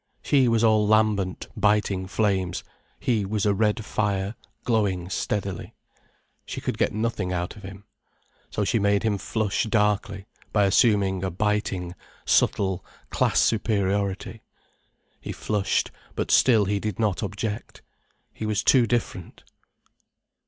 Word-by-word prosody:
She 135 -3 +3
was 115 -1 +2
all 110 -2 +4
lambent, 105 -4 +1
biting 105 -3 +1
flames, 95 -3 0 0.4
he 115 -4 +1
was 105 +1 -1
a 100 - +3
red 105 +2 0
fire 100 -2 -1 0.3
glowing 100 -6 0
steadily. 100 -2 -3 0.7
She - - -6
could - - -4
get - - +2
nothing 110 -4 -2
out 90 -1 -3
of 105 - -12
him. 100 +1 -10 0.7
So 105 - -2
she 115 +3 +1
made 100 -1 +2
him 105 -3 0
flush 110 -1 -1
darkly 105 -2 0 0.3
by 105 - +3
assuming 100 -2 +3
a 95 - 0
biting, 95 -2 -1 0.3
subtle 95 -3 +2 0.3
class - - +2
superiority. 100 -3 0 0.8
He - - -6
flushed, 105 -2 -1 0.2
but - - -2
still 115 -5 +5
he 100 +1 0
did 105 -2 -3
not 105 -4 0
object. 105 +2 -5 0.5
He 110 - -5
was 105 -1 0
too 125 -3 +5
different. 110 -7 -3
105 Hz, 130 wpm, -25 LUFS, 95-110 Hz, 0.8 s, still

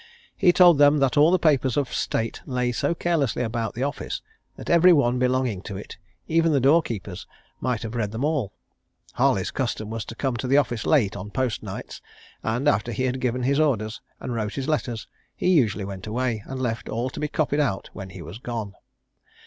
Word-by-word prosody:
He 180 - +5
told 175 -4 +6
them 145 +1 +6
that 135 -3 +2
all 150 +2 +6
the 185 - +4
papers 140 -7 +2
of 140 -3 -1
state 115 0 -2
lay 125 -1 0
so 145 +7 0
carelessly 155 -8 0
about 115 -1 -3
the 125 - -2
office 145 +1 -4 0.3
that - - -10
every 170 +2 +6
one 125 -6 +3
belonging 125 -5 +1
to 100 - -5
it, 100 - -9 0.3
even 165 0 +3
the 140 - +3
door 140 +6 +5
keepers, 100 - -6 0.3
might 125 -4 -1
have 110 0 -5
read 115 -4 -1
them 115 +6 -2
all. 150 -9 0 0.6
Harley's - - +1
custom 110 0 -3
was 115 -1 -3
to 115 - -8
come 130 0 -1
to 125 - -3
the 135 +3 +4
office 120 -6 0
late 110 -10 +3
on 100 +1 -6
post 125 +2 -1
nights, - - -7 0.4
and, 120 +6 -1
after 120 -4 +2
he 120 +3 -2
had 130 0 -1
given 125 0 -1
his 140 +3 +2
orders, 115 -8 0 0.2
and 125 - -4
wrote 110 -2 -3
his 135 -1 -3
letters, 125 -7 -2 0.3
he - - 0
usually 110 - +2
went 95 0 -7
away, 115 0 -1
and 130 0 -5
left 120 -3 -3
all 120 +3 -2
to - - -7
be 150 - -1
copied 150 -1 0
out 120 -10 -1
when 95 0 -8
he 95 -2 -9
was 85 +8 -9
gone. 115 -5 -5
125 Hz, 210 wpm, -24 LUFS, 110-145 Hz, 0.6 s, told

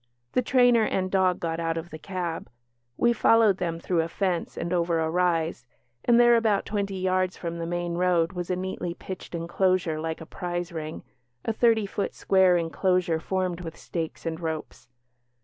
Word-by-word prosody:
The - - +3
trainer 245 -2 +4
and 185 -3 -1
dog 185 -2 +2
got 165 -1 -2
out 165 0 -1
of 165 +1 -6
the 155 - -8
cab; 175 -2 -4 0.5
we 240 0 +3
followed 225 -3 +4
them 170 -2 -2
through 170 0 +1
a 160 - -2
fence 180 0 -2
and 170 - -2
over 170 -1 +1
a 160 0 0
rise 165 -7 0 0.4
and 240 0 +5
there, 240 0 +7
about 220 -3 +2
twenty 200 -2 -2
yards 185 0 0
from 170 -1 -5
the 165 - -3
main 175 0 -2
road, 175 0 +2
was 175 -1 -4
a 180 - +1
neatly 180 -2 -4
pitched 185 -1 -8
enclosure 170 -1 0
like 160 0 -3
a 160 - -8
prize 175 0 -4
ring, 155 -1 -6 0.4
a 225 - 0
thirty 225 -2 +3
foot 200 0 -3
square 190 -2 +4
enclosure 170 +1 +1
formed 185 0 -2
with 165 -2 -7
stakes 165 -1 -5
and 165 0 -3
ropes. 160 -2 -5
180 Hz, 185 wpm, -26 LUFS, 165-190 Hz, 0.5 s, there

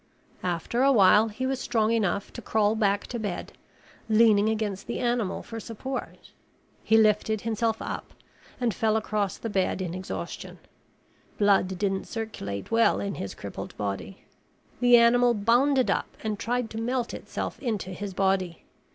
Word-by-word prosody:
After 180 +7 -1
a 275 +1 +5
while 210 -1 +6
he 225 +4 -4
was 265 0 -1
strong 220 -3 +1
enough 205 -3 0
to 240 - -7
crawl 215 -2 +2
back 205 -2 +1
to 240 - -5
bed, 205 -5 -4 0.6
leaning 215 -1 +5
against 215 -3 -2
the 235 - -3
animal 240 -5 -1
for 225 -1 -7
support. 245 +4 -6 0.5
He 220 - +4
lifted 215 -1 +3
himself 225 0 -1
up - - -6 0.4
and 240 -3 +1
fell 220 +2 +1
across 210 -2 -1
the - - -5
bed 195 -3 0
in 180 -3 -3
exhaustion. 185 0 -6 0.8
Blood 195 -2 +3
didn't 195 0 -1
circulate 155 - -5
well 230 0 +4
in 200 -1 -3
his 100 - -6
crippled - - -8
body. 100 - -5 0.5
The 245 -1 +7
animal 240 +1 +5
bounded 245 +5 +3
up - - -2
and 215 -2 -2
tried 245 0 -1
to 225 - -4
melt 245 +1 -1
itself - - -5
into 210 -7 -3
his 195 +1 -6
body. 190 -3 0
220 Hz, 155 wpm, -27 LUFS, 195-235 Hz, 0.8 s, The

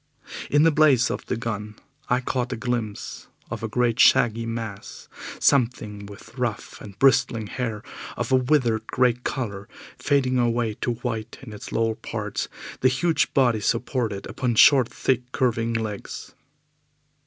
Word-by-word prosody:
In 145 +1 +4
the 165 - +5
blaze 145 -5 +4
of - - -5
the 125 - -1
gun 105 -2 -4 0.3
I 125 +1 +2
caught 125 0 -2
a - - -1
glimpse 115 -3 -4 0.2
of - - -4
a 110 - -2
great 120 +1 0
shaggy 115 0 +4
mass, 115 -3 -6 0.3
something 115 -6 +1
with 105 +5 -13
rough 120 -4 -3
and 100 -2 -11
bristling 120 -4 +3
hair 110 -1 -4 0.3
of - - -3
a - - +6
withered 125 -4 +1
grey 125 -1 +3
colour, 115 -5 -5 0.3
fading 130 -3 +1
away 120 -2 +1
to 120 - 0
white 115 -1 -3
in 110 -5 -9
its 105 - -9
lower 115 0 +1
parts, - - -4 0.3
the 130 - +4
huge 160 +6 +1
body 120 -5 +3
supported 115 -2 -1
upon 125 -3 -2
short, 130 +1 +6
thick, 125 -1 -1
curving 115 -4 0
legs. 110 -3 -5
120 Hz, 150 wpm, -24 LUFS, 110-130 Hz, 0.3 s, a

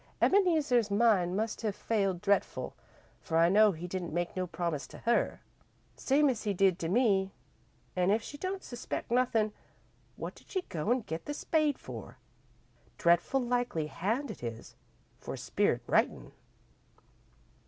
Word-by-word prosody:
Ebeneezer's 310 - +3
mind 200 -4 +3
must 220 +1 -2
have 215 -3 -1
failed 195 -5 0
dretful, 200 -1 0 0.5
for 165 - -2
I 165 +1 +5
know 210 +2 +6
he 170 -1 -7
didn't 180 -2 -4
make 175 0 -2
no 185 -1 -1
promise 170 -4 -3
to - - -12
her, 235 +1 0 0.5
same 290 +2 +3
as 245 -5 0
he 205 -3 -1
did 190 -1 +3
to 165 - -2
me, 195 -3 +2 0.6
an' 180 0 +2
if 220 +3 +2
she 290 - -8
don't 375 +5 -4
suspect 240 -1 -5
nothin', 230 -4 +2 0.6
what - - -6
did - - -19
she 375 -2 -2
go 160 - -4
an' 250 0 +2
get 165 -6 -6
the 290 - -4
spade 305 -3 +1
for? - - -9 0.8
Dretful 175 +10 +3
likely 245 -10 0
hand 220 - -2
it - - -11
is, 115 -1 -6 0.5
for - - -6
spirit - - 0
writin'." - - +1
210 Hz, 155 wpm, -31 LUFS, 175-245 Hz, 0.8 s, know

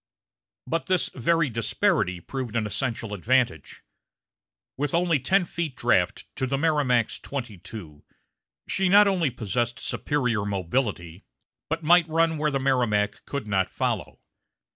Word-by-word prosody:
But 165 -4 -2
this 185 -2 +1
very 165 +5 +2
disparity 100 -5 0
proved 125 +4 -5
an 110 -2 +1
essential 115 0 -3
advantage. 115 - 0 0.9
With 145 +3 -1
only 170 -3 +2
ten 185 +8 +2
feet 165 -5 -4
draft 100 -6 +1
to 130 - -1
the 135 +1 0
Merrimac's 140 -7 +1
twenty 120 -8 -6
two, 80 -8 -10 0.6
she 190 -1 +1
not 205 +2 +7
only 180 -6 +2
possessed 120 0 -2
superior 125 -8 -1
mobility, 95 -3 -2 0.5
but 160 +1 -2
might 170 +1 +5
run 165 0 +2
where 150 0 +2
the 140 -2 -1
Merrimac 120 -6 +1
could 140 -6 -4
not 95 -3 0
follow. - - -3
130 Hz, 135 wpm, -25 LUFS, 105-155 Hz, 0.9 s, not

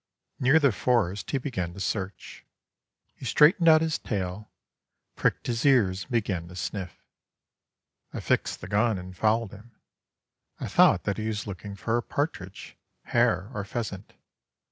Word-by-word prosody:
Near 135 +5 +5
the 140 -4 +4
forest 105 -4 0
he 140 - 0
began 95 - -4
to - - -9
search. 95 -1 -4 0.7
He - - -16
straightened 155 +7 +5
out 155 0 +7
his 160 -1 -1
tail, 100 0 -4 0.7
pricked - - 0
his 115 -1 -1
ears, 100 -9 +3
and - - -20
began 100 -7 -1
to 90 - -11
sniff. 95 0 -5 1.1
I - - -5
fixed - - -1
the 90 - -7
gun 105 +1 +2
and 90 0 -9
followed 110 +2 +1
him. 110 +3 -14 0.8
I - - -4
thought - - +5
that 100 - -2
he 110 - -2
was 110 -1 -3
looking 100 0 -7
for 115 +4 -1
a - - 0
partridge, 105 - -4 0.3
hare, 95 +4 +1
or 105 - -3
pheasant. 100 -1 -5
105 Hz, 155 wpm, -27 LUFS, 95-120 Hz, 1.1 s, out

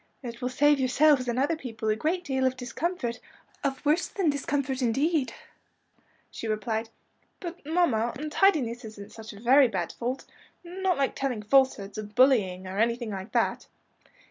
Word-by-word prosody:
"And 240 -2 -5
it 235 - -16
will 250 - -1
save 290 +3 +3
yourselves 265 0 +4
and 240 0 -1
other 290 +5 +2
people 225 -7 -6
a 215 - +3
great 330 +10 -1
deal 265 -3 +1
of 260 0 -2
discomfort, 255 -1 -3 0.4
of 275 +1 -2
worse 310 +5 +2
than 365 -7 +1
discomfort, 280 -1 -2
indeed," 270 +4 +1 1.0
she 230 - -6
replied. 220 +1 -2 0.5
"But, 350 -1 -7
mamma, 270 -9 +2
untidiness 300 -5 +1
isn't 215 -2 -10
such 220 -1 -9
a 200 - -12
very 260 +4 +6
bad 185 -6 -3
fault 250 +3 -4 0.4
not 365 +1 -1
like 275 -1 +1
telling 250 -6 -2
falsehoods, 215 -4 +2
or - - -3
bullying, 205 -5 +3
or 190 +2 -4
anything 235 0 0
like 195 +1 -6
that?" - - 0
255 Hz, 165 wpm, -27 LUFS, 225-290 Hz, 1.0 s, very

